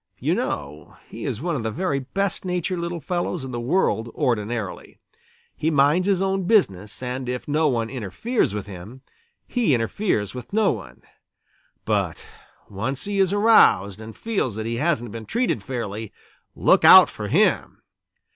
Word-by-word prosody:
You - - 0
know 75 +1 -4
he - - -7
is 115 - -4
one 170 -2 -1
of 130 - -2
the 110 - -2
very 140 - -1
best 195 +8 -2
natured 180 0 -2
little 170 -1 -4
fellows 175 -2 -2
in 130 - -7
the 120 - -4
world 120 - +1
ordinarily. 110 -3 -2 0.6
He 155 - 0
minds 150 +5 +3
his 195 -2 +2
own 195 -1 -1
business, 105 - +1
and 125 0 -4
if 125 0 -4
no 155 +2 +2
one 115 -5 0
interferes 125 - -1
with 105 -1 -4
him, 100 +7 -11 0.4
he 230 - +2
interferes 115 - -1
with 125 +7 -9
no 215 -1 +3
one. 70 - -8 0.8
But - - -1 0.4
once 115 +7 -4
he 200 -1 -2
is 190 -1 +3
aroused 200 - +4
and 110 0 -10
feels 200 - -2
that 110 0 -4
he 115 +1 -2
hasn't 130 -7 0
been 115 0 -8
treated 235 - 0
fairly, 110 -2 -5 0.4
look - - +3
out - - +10
for - - -6
him! - - +1
130 Hz, 165 wpm, -23 LUFS, 110-180 Hz, 0.8 s, out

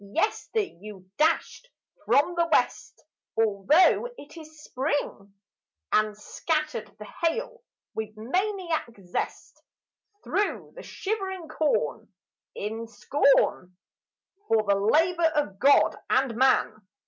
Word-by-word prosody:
Yester 430 - -1
you 200 - -10
dashed 325 +10 0 0.4
from 290 +5 +3
the 340 -1 +1
west, - - 0 0.4
Altho' 225 - +4
it 290 - -13
is 310 -2 -13
Spring, 255 -9 -3 0.6
And 215 -1 +2
scattered 305 +2 -3
the 210 - -9
hail 475 - -3 0.3
with 215 -1 -5
maniac 360 - -1 0.2
zest 175 - -5 0.6
Thro' 415 - -2
the - - -9
shivering 380 -4 -4
corn 310 -1 -1 0.4
in 225 +2 -5
scorn 235 -8 +1 0.7
For 220 -1 +3
the 200 -1 +2
labour 325 - +3
of 205 -11 -1
God 215 -6 +5
and 260 -3 +2
man. 235 -4 +2
285 Hz, 105 wpm, -26 LUFS, 215-340 Hz, 0.7 s, God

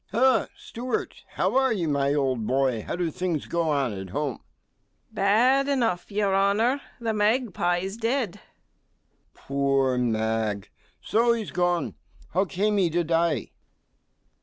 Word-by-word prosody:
Ha! 255 +1 +3
Steward, 245 +2 -4 0.2
how - - 0
are 265 -1 +3
you, 185 -7 -1
my 140 -1 +1
old 130 -6 0
boy? 130 -4 +1
How - - -4
do 175 -2 -1
things 175 -3 -2
go 170 -1 -1
on 140 -6 0
at 95 -1 -7
home? 140 +3 -3 0.7
STEWARD. - - -23
Bad 245 +8 +3
enough, 235 -10 0
your 200 -1 +1
honour; 215 +8 +2 0.2
the 230 -2 -1
magpie's 205 -4 0
dead! 230 -2 0
MR. - - -14
G. - - -20 1.0
Poor 135 -2 0
mag! 110 -3 -1 0.3
so 235 +2 +3
he's 225 -3 -4
gone. 175 -1 0 0.4
How 190 +4 +2
came 205 +3 0
he 185 -4 +3
to 170 +2 0
die? 165 -5 0
175 Hz, 145 wpm, -26 LUFS, 140-220 Hz, 1.0 s, Ha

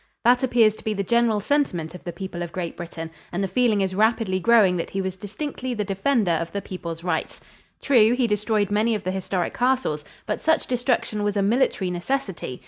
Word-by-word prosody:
That 245 +1 +5
appears 240 -4 +4
to - - -14
be 215 -1 -1
the 200 - -1
general 235 0 +2
sentiment 205 - 0
of 180 - -10
the 175 - -3
people 185 -1 -6
of 170 -1 -4
Great 175 -2 -4
Britain, 165 -1 -7 0.2
and 180 +3 -1
the - - 0
feeling 230 -1 +2
is 190 -1 0
rapidly 215 -2 +2
growing 205 -3 +4
that 170 - -3
he 195 - -3
was 190 -1 -2
distinctly 245 +5 -5
the 210 - -1
defender 195 +1 +1
of 165 0 -1
the 200 - -1
people's 170 -4 -6
rights. 175 -3 -2 0.4
True, 235 -5 +5
he 250 -1 +2
destroyed 210 -1 0
many 220 +2 +2
of 205 - -4
the 185 - -1
historic 190 -1 -2
castles, 250 - 0 0.2
but - - -3
such 320 0 +2
destruction 245 -4 0
was 205 0 0
a 200 - +2
military 200 -4 +1
necessity. 180 - -3
205 Hz, 210 wpm, -24 LUFS, 180-235 Hz, 0.4 s, That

